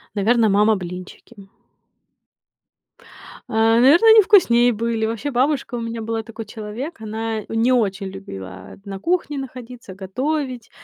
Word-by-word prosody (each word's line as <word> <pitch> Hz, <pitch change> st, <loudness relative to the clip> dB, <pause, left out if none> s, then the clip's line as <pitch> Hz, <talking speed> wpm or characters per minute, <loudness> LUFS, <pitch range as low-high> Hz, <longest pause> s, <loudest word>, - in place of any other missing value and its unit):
Наверно, 225 Hz, +3 st, +3 dB
мама 210 Hz, +2 st, +3 dB
блинчики. 185 Hz, +3 st, -10 dB, 2.0 s
Э, -, -, -8 dB, 0.3 s
наверное, 315 Hz, -, +6 dB
они 440 Hz, 0 st, +8 dB
вкуснее 245 Hz, -, +4 dB
были. 225 Hz, 0 st, -2 dB
Вообще, 230 Hz, +6 st, -3 dB
бабушка 260 Hz, 0 st, 0 dB
у 235 Hz, -, -4 dB
меня 230 Hz, 0 st, -5 dB
была 225 Hz, 0 st, -3 dB
такой 225 Hz, 0 st, -9 dB
человек. 220 Hz, -, -7 dB
Она 220 Hz, 0 st, -4 dB
не 225 Hz, +3 st, +1 dB
очень 200 Hz, -5 st, 0 dB
любила 95 Hz, -, -10 dB
на 195 Hz, -1 st, -7 dB
кухне 335 Hz, -, -1 dB
находиться, 250 Hz, -5 st, -9 dB
готовить. 255 Hz, +5 st, -4 dB
225 Hz, 125 wpm, -21 LUFS, 205-255 Hz, 2.0 s, они